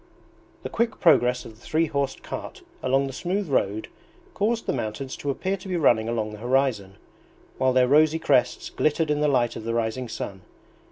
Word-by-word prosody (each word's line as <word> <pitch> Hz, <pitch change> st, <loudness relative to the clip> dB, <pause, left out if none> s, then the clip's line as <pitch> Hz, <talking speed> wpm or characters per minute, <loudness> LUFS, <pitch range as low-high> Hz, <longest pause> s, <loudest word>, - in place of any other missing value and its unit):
The -, -, -4 dB
quick 230 Hz, 0 st, -1 dB
progress 125 Hz, -7 st, +4 dB
of 110 Hz, -, -10 dB
the 110 Hz, -, -22 dB
three 160 Hz, +6 st, +1 dB
horsed 140 Hz, -3 st, -2 dB
cart -, -, -7 dB, 0.2 s
along 135 Hz, +2 st, +2 dB
the 135 Hz, -, -5 dB
smooth 185 Hz, +7 st, -2 dB
road 110 Hz, -6 st, 0 dB, 0.5 s
caused 225 Hz, +3 st, 0 dB
the -, -, 0 dB
mountains 120 Hz, +2 st, -4 dB
to 145 Hz, -, -4 dB
appear 190 Hz, +8 st, -1 dB
to 190 Hz, -, -11 dB
be 180 Hz, -2 st, -1 dB
running 115 Hz, -8 st, +3 dB
along 110 Hz, -2 st, -2 dB
the 105 Hz, -, -9 dB
horizon, 120 Hz, -5 st, 0 dB, 0.6 s
while 130 Hz, 0 st, +3 dB
their 125 Hz, 0 st, +4 dB
rosy 155 Hz, +3 st, +4 dB
crests 140 Hz, -5 st, +1 dB
glittered 155 Hz, 0 st, +1 dB
in 150 Hz, 0 st, 0 dB
the 150 Hz, -, +3 dB
light 125 Hz, -4 st, +2 dB
of -, -, -6 dB
the 115 Hz, +1 st, -2 dB
rising 115 Hz, +2 st, -2 dB
sun. 95 Hz, -3 st, -6 dB
130 Hz, 190 wpm, -25 LUFS, 115-155 Hz, 0.6 s, progress